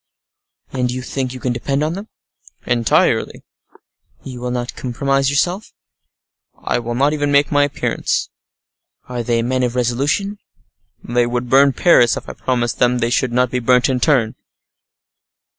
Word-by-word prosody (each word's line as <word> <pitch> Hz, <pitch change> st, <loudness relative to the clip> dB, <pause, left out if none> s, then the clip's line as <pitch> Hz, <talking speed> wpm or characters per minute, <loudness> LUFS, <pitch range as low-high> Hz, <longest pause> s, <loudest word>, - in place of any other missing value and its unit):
"And 125 Hz, -1 st, 0 dB
you 125 Hz, 0 st, -5 dB
think 130 Hz, 0 st, -3 dB
you 130 Hz, -, -8 dB
can 125 Hz, -1 st, -1 dB
depend 140 Hz, +4 st, -1 dB
on 155 Hz, +2 st, -1 dB
them?" 200 Hz, +4 st, -7 dB, 0.6 s
"Entirely." 120 Hz, -2 st, +1 dB, 0.8 s
"And -, -, -10 dB
you 125 Hz, -, -9 dB
will 125 Hz, -, -3 dB
not 125 Hz, 0 st, -4 dB
compromise 135 Hz, +2 st, 0 dB
yourself?" 175 Hz, +8 st, -1 dB, 0.8 s
"I -, -, -1 dB
will 120 Hz, 0 st, -4 dB
not 140 Hz, +4 st, +2 dB
even 145 Hz, -1 st, -1 dB
make 140 Hz, 0 st, +3 dB
my 145 Hz, -1 st, +4 dB
appearance." 145 Hz, -, -2 dB, 0.8 s
"Are 125 Hz, -1 st, -4 dB
they 115 Hz, 0 st, 0 dB
men 130 Hz, +2 st, 0 dB
of 125 Hz, -1 st, -1 dB
resolution?" 140 Hz, -, -1 dB, 0.6 s
"They 120 Hz, 0 st, +1 dB
would 120 Hz, 0 st, -3 dB
burn 135 Hz, +1 st, +5 dB
Paris, 120 Hz, -9 st, +4 dB
if -, -, -8 dB
I -, -, -6 dB
promised 120 Hz, -2 st, -2 dB
them 125 Hz, 0 st, +3 dB
they 120 Hz, 0 st, -1 dB
should 130 Hz, -1 st, +1 dB
not 125 Hz, 0 st, +1 dB
be 125 Hz, -, 0 dB
burnt 125 Hz, +2 st, +3 dB
in 130 Hz, -1 st, 0 dB
turn." 120 Hz, -5 st, +2 dB
125 Hz, 160 wpm, -18 LUFS, 120-140 Hz, 0.8 s, burn